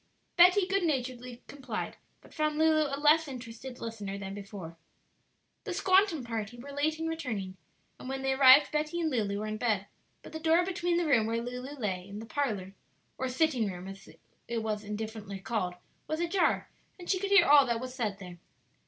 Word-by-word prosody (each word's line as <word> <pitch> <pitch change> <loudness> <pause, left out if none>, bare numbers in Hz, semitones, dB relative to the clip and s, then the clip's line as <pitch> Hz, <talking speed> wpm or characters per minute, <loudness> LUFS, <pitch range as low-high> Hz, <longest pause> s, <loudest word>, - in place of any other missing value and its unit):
Betty 360 +2 +6
good 390 +1 0
naturedly 250 -6 -3
complied, 265 -6 -5 0.3
but - - -18
found 305 -1 0
Lulu 310 -1 +4
a 275 0 -3
less 305 +2 +4
interested 250 -1 -8
listener 210 -5 -5
than 195 -1 -6
before. 195 -4 -8 0.9
The 380 - -4
"squantum" 375 -5 +3
party 225 0 -4
were 275 +4 -9
late 300 +3 0
in 325 - -4
returning, 225 -13 -4 0.4
and 255 - -8
when 270 0 -4
they 270 0 +1
arrived 265 +1 +7
Betty 305 +3 -1
and 320 -2 0
Lulu 210 -5 0
were 210 - -3
in 215 0 -3
bed; 215 -4 0 0.4
but - - -12
the 315 - -4
door 330 +2 +3
between 350 -2 0
the 345 - +1
room 245 -8 +3
where 230 +1 -1
Lulu 250 +4 -6
lay 190 -5 -3
and 205 +1 -7
the 225 - -8
parlor, 215 -8 -2 0.5
or 260 - -1
sitting 255 -5 +1
room, 180 +1 -8
as 195 0 -10 0.4
it 230 -1 -2
was 215 -1 -2
indifferently 210 -1 -5
called, 185 -2 -2 0.3
was 310 +1 -2
ajar, 345 +1 +1 0.3
and 355 -2 -11
she 375 - +1
could 395 +1 -2
hear 400 +1 +7
all 285 -2 +7
that 235 -1 0
was 255 +1 -6
said 220 -6 -2
there. 180 -3 -10
255 Hz, 195 wpm, -30 LUFS, 215-315 Hz, 0.9 s, arrived